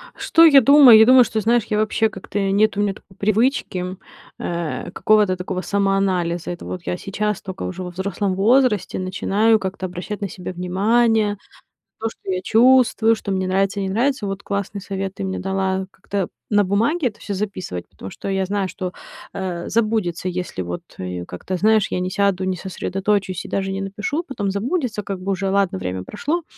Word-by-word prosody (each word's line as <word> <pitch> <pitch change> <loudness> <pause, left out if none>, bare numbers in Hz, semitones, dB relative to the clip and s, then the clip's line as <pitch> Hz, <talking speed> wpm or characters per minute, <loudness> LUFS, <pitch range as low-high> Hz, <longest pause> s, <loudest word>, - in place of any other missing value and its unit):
Что 330 0 +5
я 280 -4 +8
думаю? 260 -3 +8
Я 220 - +8
думаю, 255 +1 +8
что, 220 - -2
знаешь, 235 +2 +2
я 210 - -1
вообще 215 +1 +1
как-то 195 +1 -5
нет 200 +2 +2
у - - +2
меня 205 -1 +1
такой 190 - -19
привычки, 200 -4 0 0.4
э, 170 -2 -4
какого-то 210 -3 +3
такого 180 0 -4
самоанализа. 190 -4 0
Это 175 - -7
вот 180 - -5
я 180 - -2
сейчас 210 +1 -2
тока, 190 0 -7
уже 185 0 -5
во 180 - -5
взрослом 190 +1 -2
возрасте, 215 -2 +2
начинаю 200 +4 +2
как-то 190 -1 -4
обращать 185 +4 -6
на 200 - -1
себя 180 0 -7
внимание. 210 +4 +2 0.6
То, 225 - -1
что 195 - -7
я 185 0 -1
чувствую, 230 0 +4
что 210 -2 -5
мне 190 -1 -1
нравится, 195 +2 +1
не 195 -1 -2
нравится. 235 +3 0
Вот 195 0 -4
классный 200 0 -3
совет 195 -1 -4
ты - - -5
мне 190 0 -3
дала- 190 0 -1
как-то 195 0 -3 0.2
на 205 -1 +4
бумаге 230 - +1
это 220 - -7
всё 205 - -5
записывать, 185 - -4
потому 95 - -10
что - - -6
я 190 -1 0
знаю, 195 0 -1
что, 180 0 -5 0.4
э, 185 -3 -4
забудется, 215 -6 0
если 180 - -4
вот 90 0 -5 0.2
я, 90 -1 -5
как-то, 180 - -5
знаешь, 215 +2 +3
я - - -2
не 185 0 -2
сяду, 200 -1 +1
не 185 0 -1
сосредоточусь 190 +1 -2
и - - -8
даже 195 0 -1
не 195 0 -3
напишу. 210 - -3
Потом 205 -7 -2
забудется, 230 - -2
как 195 -2 -5
бы 190 +2 -3
уже 195 0 -1
ладно, 195 - +1
время 90 0 -4
прошло. 310 - -3
195 Hz, 190 wpm, -21 LUFS, 185-215 Hz, 0.6 s, я